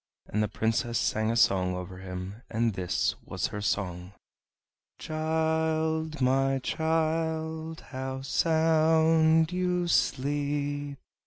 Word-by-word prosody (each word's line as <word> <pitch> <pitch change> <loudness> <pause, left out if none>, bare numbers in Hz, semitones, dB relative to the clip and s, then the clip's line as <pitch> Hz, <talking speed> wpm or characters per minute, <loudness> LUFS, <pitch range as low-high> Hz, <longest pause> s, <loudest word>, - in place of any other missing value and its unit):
And 105 - -1
the 105 - +1
Princess 115 +2 -1
sang 110 +2 0
a 115 - 0
song 95 -4 +3
over 90 0 -7
him, 95 +3 -7
and 115 0 0
this 95 -1 0
was - - -3
her 105 - -4
song: 90 -2 -2 0.8
"Child, 160 0 -1
my 135 +1 +2
child, 160 +2 -1
how 130 0 -5
sound 160 +1 +3
you 180 -1 0
sleep! 145 -1 0
145 Hz, 105 wpm, -28 LUFS, 110-160 Hz, 0.8 s, song